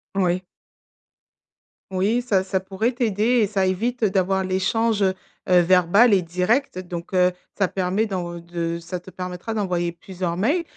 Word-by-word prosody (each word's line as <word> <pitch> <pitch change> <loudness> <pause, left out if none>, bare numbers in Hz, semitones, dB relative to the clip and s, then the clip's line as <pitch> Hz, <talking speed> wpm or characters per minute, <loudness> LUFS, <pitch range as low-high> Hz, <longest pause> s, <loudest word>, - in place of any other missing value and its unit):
Oui. 185 -1 +1 1.5
Oui, 200 +6 +1
ça 200 -6 +1
ça 190 0 -1
pourrait 195 +6 -2
t'aider 235 0 +1
et 210 - +3
ça 195 -2 0
évite 230 +6 -1
d'avoir 190 -1 +1
l'échange, 205 +3 +1
heu, 190 -1 +3 0.4
heu, 180 -1 +6
verbal 185 +6 +5
et 190 - +4
direct 180 +7 0
donc, 175 -1 -7
heu, 180 0 +4 0.3
ça 195 - +2
permet 190 +4 0
dans 175 -4 -4
de 170 0 -4
ça 175 +2 -6
te 185 +2 -13
permettra 180 +4 -5
d'envoyer 180 -5 -1
plusieurs 175 0 -5
mails 290 - +1
190 Hz, 155 wpm, -23 LUFS, 180-210 Hz, 1.5 s, heu